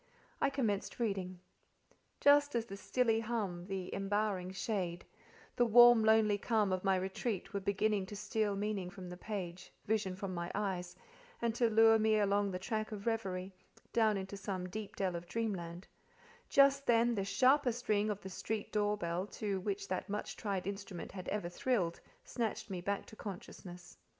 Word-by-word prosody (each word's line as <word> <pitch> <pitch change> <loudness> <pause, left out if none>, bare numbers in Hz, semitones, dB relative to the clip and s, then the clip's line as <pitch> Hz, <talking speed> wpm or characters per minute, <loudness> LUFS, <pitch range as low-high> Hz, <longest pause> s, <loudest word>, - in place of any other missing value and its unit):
I 280 - +4
commenced 225 -8 -1
reading. 190 -5 -2 0.8
Just 285 -1 +5
as 230 -1 +1
the 195 - -7
stilly 225 +2 +1
hum, 205 -6 -3
the 190 -2 -4
embowering 195 -2 -1
shade, 185 -2 -3 0.5
the 245 - +5
warm, 240 0 +8
lonely 220 -2 +4
calm 210 -3 +1
of 185 - -2
my 195 -1 +3
retreat 190 +3 -3
were 200 - 0
beginning 200 0 0
to 205 - -7
steal 210 0 -1
meaning 200 -2 -2
from 185 -1 -9
the 180 - -6
page, 185 -3 -6
vision 210 -3 0
from 190 0 -4
my 170 0 -3
eyes, 185 -3 -2 0.4
and 235 -1 0
to 235 0 +2
lure 225 0 +6
me 220 0 +3
along 200 -1 +2
the 185 - -3
track 215 +3 -3
of 205 -2 -6
reverie, 195 -5 -2 0.4
down 220 -3 +3
into 195 +1 -5
some 190 -2 -4
deep 210 +1 -6
dell 185 -3 -1
of 170 0 -6
dreamland—just 230 - -1
then, 235 0 +4
the 200 -4 -1
sharpest 245 +4 +2
ring 210 0 +2
of 205 -1 -2
the 190 - -7
street 215 +3 -4
door 210 0 +1
bell 175 0 -2
to 205 -2 -3
which 195 +1 -3
that 185 +1 -3
much 210 +1 -3
tried 195 -4 -3
instrument 200 -2 -5
had 185 -2 -7
ever 205 -4 -2
thrilled, 175 -2 0 0.2
snatched 225 -3 -3
me 180 -2 -3
back 200 +2 -2
to - - -13
consciousness. 180 -3 -9
205 Hz, 170 wpm, -34 LUFS, 185-220 Hz, 0.8 s, warm